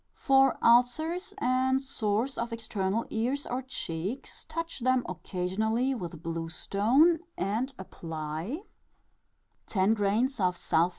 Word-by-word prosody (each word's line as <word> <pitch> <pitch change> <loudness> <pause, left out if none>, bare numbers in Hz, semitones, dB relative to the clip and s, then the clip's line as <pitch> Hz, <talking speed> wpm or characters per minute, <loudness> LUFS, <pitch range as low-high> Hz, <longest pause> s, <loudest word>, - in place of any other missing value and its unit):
For 270 -2 +4
ulcers 315 - +3
and 260 -2 +2
sores 240 -1 -1
of 235 0 -3
external 220 -2 -1
ears 255 +6 -1
or 250 +2 -2
cheeks, 210 -2 -5
touch 330 -1 -4
them 255 0 +2
occasionally 200 +8 -1
with 170 -8 -6
blue 165 0 -3
stone, 250 - +3 0.2
and 220 +8 -1
apply 165 - -5 1.0
℞ 210 +5 +2
Sulph. 180 -6 +1
230 Hz, 105 wpm, -29 LUFS, 185-265 Hz, 1.0 s, For